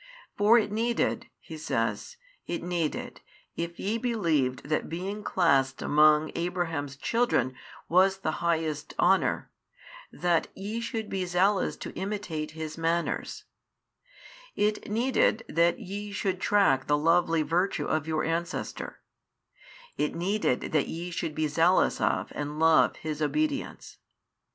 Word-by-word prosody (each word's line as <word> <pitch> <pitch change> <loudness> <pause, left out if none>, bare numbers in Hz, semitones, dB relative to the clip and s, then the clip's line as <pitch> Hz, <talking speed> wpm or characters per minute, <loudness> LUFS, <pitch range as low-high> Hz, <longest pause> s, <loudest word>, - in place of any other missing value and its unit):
For 210 +3 +5
it 210 -3 +1
needed 235 +1 0
(He 160 - -9
says) 150 - -2 0.3
it 170 - -3
needed, 175 -3 -3 0.3
if 170 0 -4
ye 220 +4 -1
believed 165 - 0
that 155 0 -1
being 195 +5 -4
classed 135 -9 +2
|639 - - -6
among 150 +1 +4
Abraham's 165 -5 -2
children 140 - +1 0.3
was 190 +3 +4
the 175 -5 -2
highest 160 -3 -1
honour, 190 +2 +2 0.6
that 175 -2 +1
ye 210 +4 -4
should 225 -2 -3
be 190 -2 -2
zealous 190 +3 +2
to - - -7
imitate 190 -6 -4
his 155 0 -5
manners: 165 +1 -1 1.1
it 210 0 0
needed 230 0 +2
that 170 +2 +2
ye 205 +2 -6
should 195 -2 -2
track 195 -11 +3
the 145 - +3
lovely 165 +1 +3
virtue 175 +6 0
of 155 -1 -1
your 155 -1 0
ancestor, 170 +1 -3 1.0
it 150 - 0
needed 185 -6 0
that 150 -3 +2
ye 175 +2 -5
should 165 -3 -3
be 155 0 +1
zealous 165 +5 +3
of - - 0
and 145 +1 -4
love 160 0 +4
his 155 -1 -5
obedience. 290 - -2
170 Hz, 130 wpm, -28 LUFS, 155-200 Hz, 1.1 s, For